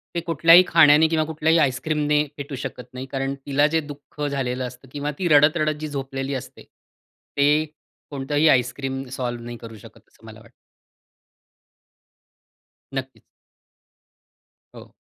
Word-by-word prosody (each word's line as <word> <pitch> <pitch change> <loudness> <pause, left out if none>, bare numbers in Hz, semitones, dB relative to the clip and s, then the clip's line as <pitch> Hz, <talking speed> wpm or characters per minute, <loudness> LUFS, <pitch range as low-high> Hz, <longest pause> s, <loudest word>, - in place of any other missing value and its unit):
ते - - +1
कुठल्याही 165 +2 +6
खाण्याने 160 -1 +6
किंवा 160 -1 +1
कुठल्याही 160 +1 +1
आइसक्रीमने 150 +2 +1
फेटू 140 -1 -6
शकत 125 - -6
नाही, 130 +1 -6
कारण 135 0 -3
तिला 145 +1 +2
जे 160 +1 +1
दुःख 145 0 -11
झालेलं 130 -2 -2
असतं 125 +1 -14
किंवा 145 0 -3
ती 180 - 0
रडत-रडत 155 0 +3
जी 155 - -4
झोपलेली 135 -1 -5
असते, - - -14
ते 145 +2 -2 0.4
कोणतंही 145 +2 0
आइसक्रीम 135 +1 0
सॉल्व्ह 120 -2 -4
नाही 120 0 -7
करू 115 -1 -11
शकत, - - -16
असं - - -23
मला - - -12
वाटतं. - - -19 2.4
नक्कीच. 130 -1 -6 1.5
हो. - - -14
145 Hz, 130 wpm, -22 LUFS, 135-155 Hz, 2.4 s, कुठल्याही